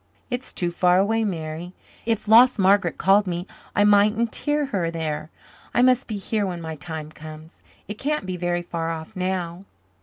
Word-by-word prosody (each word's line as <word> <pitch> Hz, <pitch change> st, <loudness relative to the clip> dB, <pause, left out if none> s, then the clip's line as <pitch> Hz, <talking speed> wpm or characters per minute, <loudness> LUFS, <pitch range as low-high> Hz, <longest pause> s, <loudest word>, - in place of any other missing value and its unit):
"It's 245 Hz, +1 st, -4 dB
too 175 Hz, -1 st, -2 dB
far 180 Hz, +1 st, +3 dB
away, 220 Hz, +4 st, +2 dB
Mary. 170 Hz, -2 st, -4 dB, 0.3 s
If 225 Hz, -2 st, -1 dB
lost 240 Hz, +4 st, +7 dB
Margaret 190 Hz, -3 st, +3 dB
called 195 Hz, +3 st, +4 dB
me 175 Hz, 0 st, -3 dB, 0.3 s
I 205 Hz, -, +4 dB
mightn't 210 Hz, +2 st, +3 dB
hear 295 Hz, 0 st, 0 dB
her 190 Hz, -11 st, -1 dB
there. 160 Hz, -2 st, -4 dB, 0.5 s
I 245 Hz, -, +4 dB
must 255 Hz, 0 st, +3 dB
be 215 Hz, -, -3 dB
here 210 Hz, +2 st, -1 dB
when 175 Hz, -2 st, -4 dB
my 160 Hz, -1 st, -6 dB
time 155 Hz, -1 st, -7 dB
comes. 155 Hz, +1 st, -12 dB, 0.3 s
It 210 Hz, +1 st, -7 dB
can't 300 Hz, -4 st, -1 dB
be 185 Hz, -1 st, -3 dB
very 175 Hz, 0 st, -1 dB
far 165 Hz, -1 st, -3 dB
off 165 Hz, +6 st, -6 dB
now." 185 Hz, -1 st, -3 dB
185 Hz, 180 wpm, -23 LUFS, 165-215 Hz, 0.5 s, lost